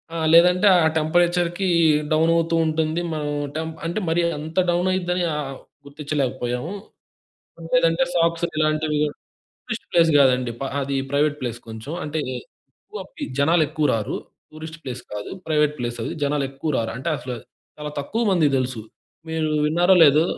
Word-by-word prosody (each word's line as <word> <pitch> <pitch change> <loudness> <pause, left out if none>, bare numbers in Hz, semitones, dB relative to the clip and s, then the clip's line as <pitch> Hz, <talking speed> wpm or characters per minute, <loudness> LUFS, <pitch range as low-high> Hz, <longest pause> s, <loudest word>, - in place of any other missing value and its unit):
ఆ! - - -2 0.2
లేదంటే 180 +4 +6
ఆ - - +3
టెంపరేచర్‌కి 175 +3 +1 0.4
డౌన్ 160 +2 +3
అవుతూ 165 0 +1
ఉంటుంది. 160 +1 0
మన 155 -1 -3 0.3
టెం 160 0 -2 0.2
అంటే 170 +6 -1
మరి 170 +1 +2 0.2
అంత 160 +3 -8
డౌన్ 175 +1 +1
అయిద్దని 180 -1 0
ఆహ్ 135 -3 -4 0.3
గుర్తించలేకపోయాము. 140 0 -3 1.0
లేదంటే - - +3
సాక్స్‌లు 170 0 +1
ఇలాంటివి 155 -1 +1 0.7
టూరిస్ట్ - - -5
ప్లేస్ 165 -1 +5
కాదండి. 125 -3 +3 0.3
అది 140 0 -2
ప్రైవేట్ 145 +1 +1
ప్లేస్ 120 -2 -4
కొంచెం 110 +7 -7
అంటే 155 +1 -3 0.7
ఎక్కువ - - -7 0.4
జనాలెక్కువ 155 0 +2
రారు. 110 -2 -2 0.4
టూరిస్ట్ 160 +1 -9
ప్లేస్ 125 -1 -6
కాదు 105 0 -5 0.2
ప్రైవేట్ 150 -1 +2
ప్లేస్ 120 -1 -4
అది. - - -3
జనాలు 145 0 0
ఎక్కువ 135 +3 -4
రారు. 115 - -1
అంటే 135 +6 -4
అసలు 125 -1 -6 0.4
చాలా 150 0 -5
తక్కువ 225 +11 -2
మందికి 155 -6 +3
తెలుసు. 125 -3 -2 0.5
మీరు 160 -1 -1 0.2
విన్నారో 175 +4 +4
లేదో! 150 +3 +5
155 Hz, 140 wpm, -22 LUFS, 140-170 Hz, 1.0 s, లేదంటే